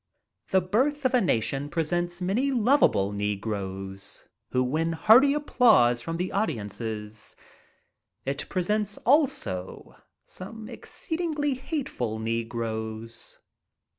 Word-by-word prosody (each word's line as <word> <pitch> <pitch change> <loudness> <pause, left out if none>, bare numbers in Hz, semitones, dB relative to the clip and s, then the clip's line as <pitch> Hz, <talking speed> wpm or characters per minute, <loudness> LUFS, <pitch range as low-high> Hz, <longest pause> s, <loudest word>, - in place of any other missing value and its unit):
"The 190 - +4
Birth 265 +10 0
of 255 - +3
a 250 - +5
Nation" 135 - 0
presents 175 +2 -1
many 225 +10 +1
lovable 240 - +3
negroes 100 -2 -4 0.2
who 125 - +2
win 160 +6 0
hearty 255 - +6
applause 220 - +4
from 165 +6 -4
the 180 +2 -2
audiences. 110 - -3 0.9
It 135 +1 -3
presents 205 +2 0
also 230 - +1 0.3
some 215 +4 -9
exceedingly 320 -4 -2
hateful 255 - -3
negroes. 115 0 -4
165 Hz, 100 wpm, -27 LUFS, -, 0.9 s, hearty